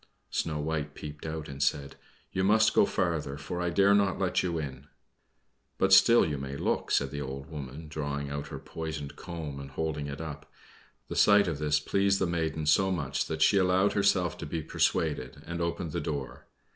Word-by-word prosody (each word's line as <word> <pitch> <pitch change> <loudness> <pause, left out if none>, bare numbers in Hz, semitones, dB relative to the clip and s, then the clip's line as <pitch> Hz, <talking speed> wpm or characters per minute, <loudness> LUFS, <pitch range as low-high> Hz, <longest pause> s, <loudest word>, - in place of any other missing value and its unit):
Snow 75 -2 -1
White 75 -1 -3
peeped 75 +1 -8
out 80 -1 -4
and 70 0 -7
said, 70 0 0 0.4
"You 95 - -1
must 110 +3 +4
go - - +5
farther, 80 -6 -1
for 80 +5 -5
I 90 - 0
dare 100 +3 +4
not 100 -2 +3
let 95 -2 +1
you 85 -2 -1
in." 70 -3 -6 0.9
"But 95 0 +3
still 100 +5 +7
you 75 -3 -2
may 70 0 -5
look," - - -1
said 70 -1 +1
the 70 0 -4
old 70 +1 -6
woman, 75 +1 -7
drawing 70 -2 -4
out 70 0 -4
her - - -6
poisoned 80 -3 -6
comb 80 -5 -6
and 70 0 -8
holding 75 +1 -3
it 70 -1 -6
up. 80 -3 -7 0.6
The - - -5
sight 100 -1 +5
of 80 -4 -2
this 75 0 +2
pleased 100 +5 +2
the 95 - +1
maiden 80 -3 -1
so 95 +6 +4
much 70 -7 -1
that 80 -1 0
she 100 - +5
allowed 95 +2 +3
herself 95 -4 +2
to - - -5
be 80 -2 -3
persuaded, 75 -4 -1
and 85 +1 -4
opened 85 -1 -2
the - - -2
door. 70 -5 -5
80 Hz, 195 wpm, -29 LUFS, 70-90 Hz, 0.9 s, still